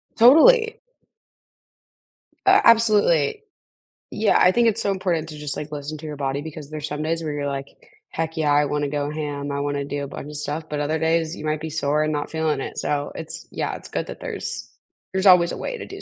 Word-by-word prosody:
Totally. 450 - +6 1.7
A - - +5
absolutely. 230 - +4 0.7
Yeah, 215 -1 +2
I 180 - +6
think 235 +3 +3
it's 225 0 +1
so 200 - 0
important 175 -5 -1
to 150 - -8
just, 150 -2 -3
like, 150 0 -6
listen 150 +1 -5
to 155 - -8
your 150 - -5
body 135 0 -2
because 155 -1 -9
there's 155 0 -4
some 150 +1 -4
days 165 +1 -1
where 155 - -3
you're, 145 -1 -2
like, 140 0 -4 0.4
"Heck 160 0 -4
yeah, 150 -2 +2
I 145 0 +4
want 145 +1 -1
to 145 - -1
go 145 0 -2
ham, 145 -2 -4
I 140 - -2
wanna 145 0 -2
do 145 0 -4
a - - -4
bunch 140 - -8
of 150 - -9
stuff," 150 +2 -3
but 150 -1 -3
other 150 +2 0
days 160 +1 +1
you 155 - -8
might 155 0 -1
be 160 - -4
sore 150 0 +1
and 155 0 -1
not 145 0 -3
feeling 160 -3 0
it, - - -6
so 145 -1 -2
it's, 160 -1 -7
yeah, - - -3
it's - - -8
good - - -3
that - - -8
there's - - -5 0.4
there's 190 +1 0
always 180 -2 +6
a - - -5
way - - -4
to - - -7
do 395 0 -9
155 Hz, 230 wpm, -23 LUFS, 145-180 Hz, 1.7 s, Totally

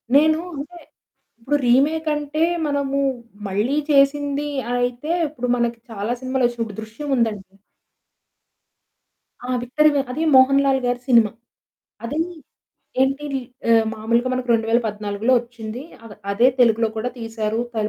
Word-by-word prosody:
నేను 310 +2 +5 0.2
అంటే 305 +5 -7 0.6
ఇప్పడు 265 +6 0
రీమేకంటే 300 +3 +1 0.2
మనము 280 -1 -1 0.5
మళ్ళీ 210 +9 0
చేసింది 285 0 +2 0.3
అయితే 245 +4 -2 0.2
ఇప్పుడు 250 -4 -5
మనకి 235 -1 -1
చాలా 215 +1 -3
సినిమాలొచ్చినయి 250 -3 0
ఇప్పుడు 210 -2 -10
'దృశ్యం' 225 +7 -6
ఉందండి 210 -5 -2 1.9
ఆ! - - -6
విక్టరీ 300 +5 +3
వే 280 - +3
అది 305 +6 -2
మోహన్ 270 +1 +6
లాల్‌గారి 255 -3 +1
సినిమా. 230 -5 +5 0.7
అది 290 +7 -3 0.8
ఏంటి 275 +2 +1 0.4
ఆ - - +6 0.2
మాములుగా 235 +3 0
మనకు 255 0 -3
2014 225 0 0
ఒచ్చింది. 235 0 -8 0.5
అదే 235 +5 +4
తెలుగులో 230 -2 +4
కూడా 230 +3 -1
తీశారు, 225 -1 -3
త - - -15
245 Hz, 115 wpm, -21 LUFS, 225-280 Hz, 1.9 s, మోహన్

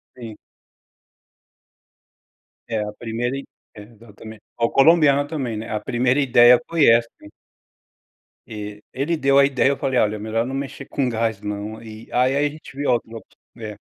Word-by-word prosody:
Sim. 115 -4 -10 2.3
É, 110 -2 -2
a 105 - -5
primeira 120 +4 -4
e 140 - -8 0.3
é, 105 - -10
exatamente, 110 -1 -14 0.2
ao 115 0 0
colombiano 145 -1 +4
também, 130 -8 -4
né, 110 +1 -7
a 105 -1 -2
primeira 125 +5 0
ideia 120 -2 +6
foi 165 -3 +3
essa. 115 0 +5 1.4
E 105 -1 -8
ele 145 +6 -1
deu 140 -1 +3
a 140 - +6
ideia, 135 -1 +2
eu 140 - -1
falei: 130 -2 0
"Olha, 105 0 +1
é - - -10
melhor 110 +2 -2
não 130 - -6
mexer 135 0 -6
com 135 -4 -2
gás 110 -2 -2
não", 105 +2 -6
e 110 -1 -11
aí, 130 +2 +2
a - - +1
a - - -4
gente 150 -2 -13
viu 145 +1 -3
outra 115 -1 -4
opção - - -16 0.2
é, 110 -2 -7
120 Hz, 175 wpm, -21 LUFS, 110-135 Hz, 2.3 s, ideia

